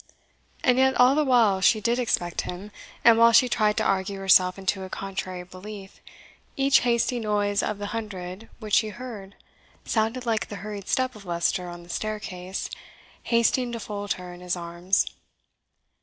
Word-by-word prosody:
And 250 Hz, -1 st, +4 dB
yet 265 Hz, 0 st, +4 dB
all 250 Hz, +2 st, +6 dB
the 305 Hz, +1 st, +2 dB
while 230 Hz, -8 st, +3 dB
she 215 Hz, +3 st, +4 dB
did 235 Hz, +3 st, 0 dB
expect 175 Hz, -8 st, 0 dB
him; 190 Hz, +4 st, -7 dB, 0.3 s
and 230 Hz, -1 st, +7 dB
while 230 Hz, 0 st, +7 dB
she 235 Hz, +2 st, +6 dB
tried 215 Hz, -3 st, +1 dB
to -, -, +2 dB
argue 195 Hz, 0 st, 0 dB
herself 185 Hz, -1 st, +4 dB
into 195 Hz, 0 st, -1 dB
a 190 Hz, -, -7 dB
contrary 185 Hz, -2 st, -5 dB
belief, 195 Hz, +2 st, -11 dB, 0.6 s
each 275 Hz, 0 st, +5 dB
hasty 240 Hz, 0 st, +1 dB
noise 205 Hz, -2 st, 0 dB
of 210 Hz, -, -2 dB
the 205 Hz, -, -5 dB
hundred 200 Hz, -2 st, -6 dB
which 215 Hz, -3 st, -8 dB
she 220 Hz, -, +4 dB
heard 210 Hz, -4 st, -9 dB, 0.5 s
sounded 225 Hz, +3 st, -1 dB
like 225 Hz, -2 st, 0 dB
the 205 Hz, -, -6 dB
hurried 205 Hz, -2 st, -6 dB
step 255 Hz, -1 st, 0 dB
of 210 Hz, -, -12 dB
Leicester 175 Hz, 0 st, -1 dB
on 175 Hz, 0 st, -9 dB
the 170 Hz, -, -17 dB
staircase, 190 Hz, -2 st, -4 dB, 0.6 s
hasting 235 Hz, +1 st, +2 dB
to 230 Hz, -, -4 dB
fold 205 Hz, -1 st, -3 dB
her 180 Hz, -1 st, -9 dB
in 175 Hz, -, -12 dB
his 180 Hz, 0 st, -2 dB
arms. 175 Hz, +2 st, 0 dB
205 Hz, 170 wpm, -25 LUFS, 185-235 Hz, 0.6 s, and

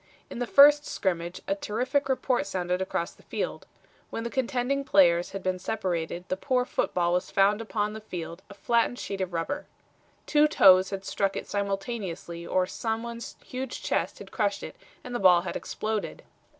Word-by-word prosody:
In -, -, -6 dB
the 245 Hz, -, -1 dB
first 290 Hz, +3 st, +7 dB
scrimmage 175 Hz, -, -2 dB
a -, -, +2 dB
terrific 255 Hz, +8 st, -1 dB
report 255 Hz, -5 st, +1 dB
sounded 180 Hz, -1 st, -1 dB
across 170 Hz, -2 st, -2 dB
the -, -, -21 dB
field. -, -, -4 dB, 0.4 s
When 225 Hz, -, -4 dB
the 235 Hz, -, -4 dB
contending 260 Hz, +2 st, 0 dB
players 175 Hz, -8 st, +4 dB
had 195 Hz, -1 st, -6 dB
been 185 Hz, 0 st, -1 dB
separated 180 Hz, -4 st, -2 dB
the -, -, -1 dB
poor 250 Hz, +3 st, +1 dB
football 175 Hz, -7 st, 0 dB
was 180 Hz, -, 0 dB
found 205 Hz, +3 st, +3 dB
upon 210 Hz, -1 st, -2 dB
the 220 Hz, -, -7 dB
field 175 Hz, -4 st, -7 dB
a 200 Hz, -, -11 dB
flattened 235 Hz, +3 st, +1 dB
sheet 195 Hz, -5 st, -4 dB
of 185 Hz, -1 st, -2 dB
rubber. 270 Hz, -, -3 dB, 0.6 s
Two 300 Hz, 0 st, +4 dB
toes 190 Hz, -9 st, +6 dB
had 195 Hz, -1 st, -5 dB
struck 195 Hz, 0 st, 0 dB
it -, -, -5 dB
simultaneously 195 Hz, -4 st, -4 dB
or 185 Hz, 0 st, +2 dB
some 225 Hz, +4 st, -3 dB
one's 235 Hz, 0 st, -7 dB
huge 255 Hz, 0 st, -5 dB
chest -, -, -1 dB
had -, -, -11 dB
crushed 200 Hz, -3 st, -1 dB
it -, -, -7 dB, 0.3 s
and 245 Hz, -, -7 dB
the 240 Hz, -, -1 dB
ball 180 Hz, -3 st, +6 dB
had 185 Hz, -, -5 dB
exploded. 215 Hz, -1 st, -3 dB
200 Hz, 180 wpm, -27 LUFS, 185-240 Hz, 0.6 s, first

